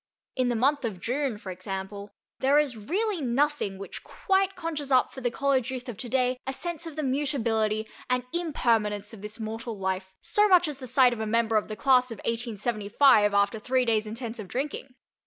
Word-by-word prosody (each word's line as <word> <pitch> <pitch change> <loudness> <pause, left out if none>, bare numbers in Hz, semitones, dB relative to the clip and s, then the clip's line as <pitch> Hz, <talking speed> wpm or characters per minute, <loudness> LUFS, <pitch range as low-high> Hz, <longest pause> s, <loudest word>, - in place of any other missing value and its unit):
In 255 -2 +1
the 240 - 0
month 275 +5 +2
of 215 -6 -3
June, 255 +1 -1
for 200 -3 -7
example, 195 +2 -6 0.3
there 275 +2 +4
is 295 -5 +2
really 370 - -1
nothing 265 -5 0
which 195 - -8
quite 390 0 0
conjures 320 -5 -4
up 255 -1 +3
for 265 - -8
the 245 - +1
college 265 0 +1
youth 255 -1 -5
of 240 - -5
today 250 +3 0
a 265 - -1
sense 340 +2 -4
of 320 - -8
the 310 - -2
mutability 230 -6 0 0.2
and 250 0 +1
impermanence 230 - 0
of 210 - -10
this 210 +2 -7
mortal 225 0 -5
life 190 0 -2
so 415 +5 +3
much 360 -3 +5
as 290 -3 -5
the 255 - -7
sight 250 0 +5
of 235 - -6
a 220 - -2
member 225 0 +1
of 215 - +2
the 215 - -5
class 255 0 +4
of 225 - -6
1875 225 -1 +2
after 200 +2 +2
three 255 +3 +1
days' 220 -2 +1
intensive 225 -2 -6
drinking. 265 +2 -4
245 Hz, 195 wpm, -27 LUFS, 215-280 Hz, 0.3 s, much